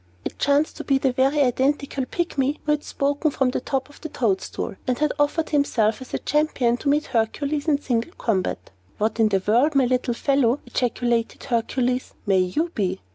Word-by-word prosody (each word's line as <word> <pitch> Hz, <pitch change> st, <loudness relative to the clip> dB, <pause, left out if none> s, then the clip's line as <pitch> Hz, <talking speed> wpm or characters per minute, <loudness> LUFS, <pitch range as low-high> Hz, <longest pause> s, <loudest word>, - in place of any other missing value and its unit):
It -, -, -5 dB
chanced 285 Hz, +2 st, +2 dB
to -, -, -5 dB
be 275 Hz, -, +2 dB
the 270 Hz, -1 st, +1 dB
very 270 Hz, +3 st, +2 dB
identical 270 Hz, +1 st, 0 dB
Pygmy 295 Hz, -3 st, -1 dB
who 300 Hz, -, +1 dB
had 300 Hz, 0 st, 0 dB
spoken 285 Hz, +2 st, 0 dB
from 265 Hz, -3 st, 0 dB
the -, -, -2 dB
top 265 Hz, 0 st, -2 dB
of 290 Hz, -, -18 dB
the 315 Hz, -, -6 dB
toadstool, 215 Hz, -9 st, -2 dB
and 250 Hz, -1 st, +1 dB
had 300 Hz, 0 st, +1 dB
offered 300 Hz, +2 st, +1 dB
himself 245 Hz, -7 st, +1 dB
as 260 Hz, -, -10 dB
a -, -, -1 dB
champion 295 Hz, -6 st, +1 dB
to 280 Hz, -, -2 dB
meet 295 Hz, +1 st, +2 dB
Hercules 280 Hz, +6 st, -1 dB
in 290 Hz, -2 st, +3 dB
single 250 Hz, +4 st, -2 dB
combat. 195 Hz, -5 st, -2 dB, 0.3 s
"What 220 Hz, +1 st, -1 dB
in 220 Hz, -1 st, +4 dB
the 195 Hz, -2 st, +1 dB
world, 250 Hz, +8 st, +3 dB
my 270 Hz, -2 st, +5 dB
little 250 Hz, -1 st, 0 dB
fellow," 275 Hz, -1 st, +2 dB
ejaculated 240 Hz, -1 st, -1 dB
Hercules, 250 Hz, +1 st, -1 dB
"may 195 Hz, -3 st, +3 dB
you 240 Hz, -, 0 dB
be?" 195 Hz, -4 st, -1 dB
265 Hz, 190 wpm, -23 LUFS, 235-290 Hz, 0.3 s, my